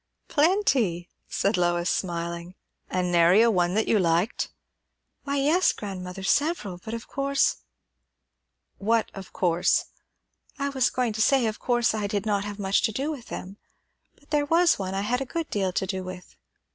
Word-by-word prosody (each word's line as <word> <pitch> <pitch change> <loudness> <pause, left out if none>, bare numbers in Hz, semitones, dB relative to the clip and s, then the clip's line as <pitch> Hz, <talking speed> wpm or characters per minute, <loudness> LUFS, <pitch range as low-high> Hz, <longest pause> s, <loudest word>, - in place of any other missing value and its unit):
"Plenty!" 280 - +2 0.2
said 200 +1 0
Lois, 175 0 +1
smiling. 170 0 -3 0.3
"An' 180 -1 -1
nary 175 +6 +5
one 180 -4 +2
that 220 - +1
you 215 - +3
liked?" 170 +4 +1 0.8
"Why, 280 0 -1
yes, 310 +7 +3
grandmother; 190 -2 -7
several; 215 - 0
but 220 - -5
of 230 - -8
course 275 0 +1 0.6
" - - -54
"What 230 -1 +2
of 195 -2 -9
course?" 175 -1 +2 0.7
"I 280 0 -1
was 265 -3 +2
going 245 -3 -1
to 220 - -2
say, 265 +1 +4
of 215 -1 -2
course 240 -2 +1
I 210 -2 -1
did 205 +1 -2
not 205 -2 +1
have 205 -1 -6
much 195 -1 +1
to - - +1
do 275 +8 -2
with 265 -6 -8
them; 195 +2 -7 0.6
but 285 - -28
there 295 -1 +1
was 340 -1 +4
one 190 -1 -3
I 195 - 0
had 245 +5 -1
a - - +1
good 330 +4 -4
deal 195 -3 0
to 195 - 0
do 190 -1 -3
with." 185 0 -9
205 Hz, 175 wpm, -26 LUFS, 185-265 Hz, 0.8 s, nary